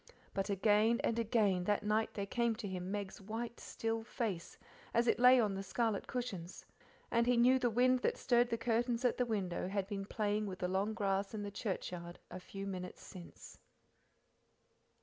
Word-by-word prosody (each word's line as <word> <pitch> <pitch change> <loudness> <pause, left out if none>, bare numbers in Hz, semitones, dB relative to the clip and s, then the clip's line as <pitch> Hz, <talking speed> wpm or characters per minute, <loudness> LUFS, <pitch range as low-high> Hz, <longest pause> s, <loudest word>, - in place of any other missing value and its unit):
But 195 0 -2
again 210 +3 +3
and 230 - +1
again 205 -5 +2
that 205 +1 +1
night 215 +1 0
there 200 - -2
came 235 +2 0
to 220 -2 -5
him 185 -1 -4
Meg's 200 0 -4
white, 230 +4 -5
still 225 0 -3
face 220 -7 -4 0.4
as 235 +1 +4
it 235 - +2
lay 250 +1 +8
on 210 -4 +2
the 195 - -3
scarlet 215 +1 -1
cushions, 210 -9 -5 0.5
and 235 0 +3
he 245 -1 +4
knew 255 +2 +5
the 245 -1 +2
wind 250 +3 +3
that - - 0
stirred 240 -1 +3
the 230 - 0
curtains 235 +1 0
at 245 - +2
the 250 - +2
window 190 -6 -1
had 195 0 -1
been 195 -1 -4
playing 210 0 -1
with 185 -2 -5
the 180 - -1
long 195 +4 0
grass 195 -1 0
in 210 - -3
the 205 - -5
churchyard 180 -4 -4
a 180 - -6
few 195 +2 -7
minutes 180 -2 -6
since. 180 -3 -11
210 Hz, 190 wpm, -35 LUFS, 195-235 Hz, 0.5 s, lay